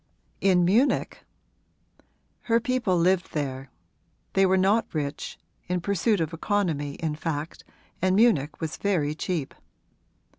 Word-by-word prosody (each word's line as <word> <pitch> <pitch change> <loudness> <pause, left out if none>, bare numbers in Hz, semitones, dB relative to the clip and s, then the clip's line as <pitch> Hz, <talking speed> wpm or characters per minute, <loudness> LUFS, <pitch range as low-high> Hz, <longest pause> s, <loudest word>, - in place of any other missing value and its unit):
'In 180 -3 +4
Munich?' 230 +10 +1 1.2
'Her 230 -1 +3
people 235 -6 0
lived 180 +2 +1
there; 135 -3 -3 0.6
they 195 0 +4
were 190 +1 +3
not 200 +4 +2
rich 145 -1 -4 0.3
in 180 +1 0
pursuit 200 +3 +1
of 160 0 -2
economy 165 -6 -1
in 160 -2 -2
fact, 155 0 -4 0.4
and 185 +1 +2
Munich 170 - +3
was 160 -2 -4
very 165 -8 0
cheap. 160 -2 -3
180 Hz, 120 wpm, -26 LUFS, 150-200 Hz, 1.2 s, In